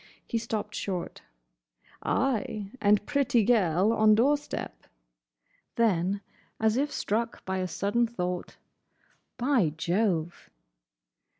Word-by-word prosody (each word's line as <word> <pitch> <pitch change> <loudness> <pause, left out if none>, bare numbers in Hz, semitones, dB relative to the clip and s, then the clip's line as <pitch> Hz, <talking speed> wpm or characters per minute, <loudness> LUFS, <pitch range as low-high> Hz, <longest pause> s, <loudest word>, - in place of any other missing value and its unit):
He 230 - -1
stopped 215 -2 -4
short. 185 -5 -4 0.8
"Ay, 215 -5 -1
and 205 -1 +3
pretty 275 -6 +2
gel 195 -3 +3
on 215 -1 +5
door 265 +7 +4
step." 290 0 -7 0.9
Then, 200 -3 +1 0.4
as 220 0 +2
if 285 +3 0
struck 230 0 -2
by 190 0 -2
a 185 - -1
sudden 205 +6 0
thought, 180 -5 -4 0.8
"By 240 - +2
Jove!" 175 -1 -1
215 Hz, 105 wpm, -28 LUFS, 190-235 Hz, 0.9 s, on